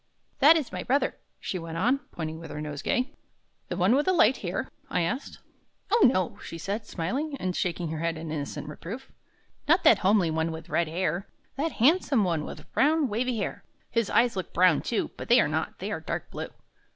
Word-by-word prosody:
"That 305 +4 +8
is 300 -6 -3
my 180 0 -4
brother," 275 +8 0 0.2
she 185 - -3
went 165 0 -6
on, 245 +10 +2
pointing 160 -1 -5
with 165 - -9
her - - -6
nosegay. 150 - -2 0.5
"The - - -4
one 190 +5 +4
with 290 +5 +2
the 375 - +4
light 260 -7 +5
hair?" 180 -2 -3 0.2
I 180 - +1
asked. 240 - -3 0.5
"O, 450 - +6
no;" 185 -7 -1
she 165 - -8
said, 205 +5 -4
smiling 275 - -2
and 185 -6 -2
shaking 175 -2 -1
her 160 0 -4
head 165 0 -1
in 160 -1 -6
innocent 145 -2 -4
reproof; 185 - -8 0.6
"not 335 +4 +4
that 215 - +7
homely 190 -4 +3
one 160 +1 0
with 160 0 -8
red 170 -1 +1
hair; 180 +3 -1 0.3
that 305 +3 -1
handsome 275 - +3
one 165 -5 0
with - - -10
brown, 300 0 +3
wavy 240 +3 -1
hair. 205 - -3 0.3
His 230 -3 +1
eyes 235 -1 +3
look 185 - -5
brown, 180 -3 +5
too; - - -1
but - - -7
they - - +7
are - - +4
not, - - -2
they - - -4
are - - -2
dark - - -5
blue. - - -5
190 Hz, 205 wpm, -27 LUFS, 165-260 Hz, 0.6 s, That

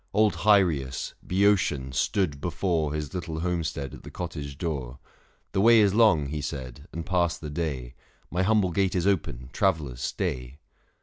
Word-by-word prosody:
161 105 +2 +4
Old 105 -1 +5 0.2
Hyrieus, 65 - -5
Boeotian, 90 -9 +2
stood 75 - 0
before 80 -3 0
His 75 +1 -4
little 85 -3 -4
homestead 80 -6 -2
at - - -10
the - - -10
cottage 75 -6 -6
door. 70 -6 -3 0.5
The 95 - +1
way 115 +1 +7
is 100 -2 +4
long, 105 -9 +5
he 75 0 -3
said, 65 -5 -6
and 85 0 -5
passed 90 -3 +1
the 75 -2 -6
day, 70 -6 -3 0.4
My 90 - 0
humble 100 -2 +3
gate 95 +1 +1
is 90 -1 +1
open, 65 -10 -1
travellers, 80 -11 0
stay. 65 +2 -3
80 Hz, 165 wpm, -27 LUFS, 70-95 Hz, 0.5 s, way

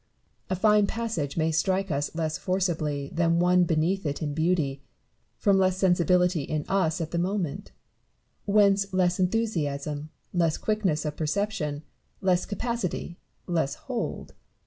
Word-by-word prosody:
A 185 - +1
fine 210 +1 +4
passage 215 -13 -3
may 160 0 +2
strike 190 +4 0
us 145 +2 -2
less 160 -2 -2
forcibly 160 -7 -1
than 170 0 +2
one 180 +1 +4
beneath 170 +4 +1
it 145 -3 -2
in 150 -3 -3
beauty, 155 -4 0 0.6
from 200 -2 +3
less 185 -1 +2
sensibility 180 -2 +3
in 150 +2 -3
us 185 -3 +1
at 160 - -4
the 170 - -1
moment; 180 -4 -2 0.7
whence 200 -1 +3
less 185 -1 +1
enthusiasm, 155 -8 -1 0.2
less 170 -3 +2
quickness 195 -8 0
of 150 -1 -3
perception, 160 -3 -2 0.4
less 180 -2 +1
capacity, 205 -6 -3 0.3
less 160 -6 0
hold. - - -5
175 Hz, 135 wpm, -27 LUFS, 155-195 Hz, 0.7 s, fine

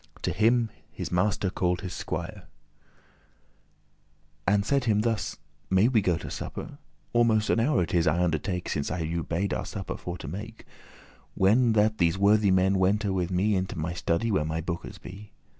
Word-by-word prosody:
To - - 0
him 115 +2 +2 0.3
this - - -4
master 95 +1 +1
called 90 -1 0
his 90 -3 -5
squier, - - -5 2.0
And 100 0 +3
said 140 -1 +1
him 105 -3 +3
thus, 115 -1 -1 0.3
"May 95 +5 +4
we 115 -5 +3
go 90 -4 +1
to - - -7
supper? - - -6 0.3
Almost 115 -2 +3
an - - +2
hour 115 -6 +2
it 80 - -5
is, 85 -2 +3
I 85 +3 +2
undertake, 90 +2 -1
Since 70 -2 -2
I 90 +2 -3
you 85 +1 -2
bade 90 +5 -2
our - - -2
supper 95 -2 -5
for 90 0 -6
to - - -8
make, 105 +8 -7 0.7
When 115 +5 +4
that 110 0 +2
these 85 0 +2
worthy 100 +1 +4
men 95 +1 +3
wente 100 +2 +2
with 90 -2 -1
me 95 +3 +1
Into 95 -2 -2
my 80 +2 -2
study, 85 +6 0
where 95 -7 +2
my 80 +1 -2
bookes 85 +1 -5
be." 100 +3 -11
95 Hz, 180 wpm, -27 LUFS, 90-110 Hz, 2.0 s, May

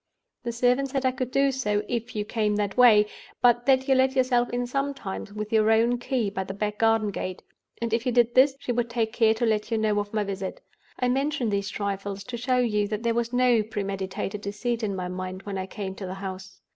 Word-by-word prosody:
The 240 - -3
servant 250 +3 +2
said 270 0 -1
I 260 - +4
could 255 -1 -3
do 275 +1 +2
so, 210 -6 0
if 235 0 -3
you 210 -1 -1
came 210 -1 0
that 205 -1 -1
way, 225 -4 +7 0.3
but 240 0 +3
that 265 0 +4
you 270 - +5
let 260 0 +3
yourself 250 -2 +2
in 245 0 -1
sometimes 270 -7 -3
with 210 +1 -5
your 220 0 +4
own 230 +2 +3
key 245 -4 -1
by 190 -1 -2
the 195 +1 -7
back 210 +1 -3
garden 225 -2 +3
gate; 185 -1 -5 0.4
and 230 -1 -2
if 235 +3 0
you - - +2
did 240 -1 +3
this, 270 +2 +5
she 255 - -4
would 240 -1 0
take 230 -2 -1
care 225 -2 +3
to 235 - 0
let 215 -2 0
you 225 - 0
know 215 -1 +1
of 205 0 -4
my 215 -1 0
visit. 195 -1 -5 0.4
I 250 - 0
mention 270 -1 0
these 200 0 -1
trifles, 200 -1 -4
to 240 +4 -6
show 250 +2 +1
you 210 -4 +1
that 215 +1 -4
there 230 0 +2
was 235 0 -1
no 245 -2 +4
pre 210 -1 -4
meditated 195 +1 -4
deceit 225 +4 -2
in 205 -3 -2
my 180 -1 -3
mind 185 +1 -5
when 200 -2 -4
I 185 - -4
came 195 -1 -5
to 190 0 -7
the 185 - -5
house. 190 -1 -8
225 Hz, 240 wpm, -26 LUFS, 205-245 Hz, 0.4 s, way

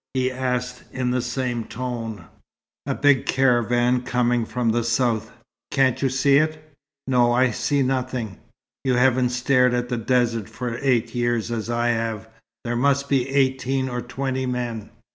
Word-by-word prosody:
he 130 0 +1
asked 125 -1 -2
in 125 -2 -1
the 125 0 +1
same 120 -1 -2
tone. 115 -5 -5 0.6
"A - - 0
big 145 -2 +3
caravan 125 -1 +2
coming 125 -1 +1
from 125 -2 -1
the 120 +1 +1
south. 115 -2 0 0.4
Can't 130 -2 +2
you 135 - +2
see 135 +2 +3
it?" 155 0 -1 0.3
"No. 125 -2 +3
I 125 +1 +3
see 140 +5 0
nothing." 125 -6 -2 0.4
"You 130 -2 +1
haven't 125 0 +3
stared 125 0 +2
at 120 0 -2
the 125 - -1
desert 115 -2 0
for 120 -2 -5
eight 120 -4 +1
years, 120 -1 -1
as 115 -1 -3
I 120 0 +1
have. 115 -2 -2 0.4
There 120 0 -2
must 140 +2 +1
be 135 -2 +1
eighteen 130 -1 +1
or 125 -1 -3
twenty 130 +1 -3
men." 120 -4 -3
125 Hz, 160 wpm, -23 LUFS, 120-130 Hz, 0.6 s, big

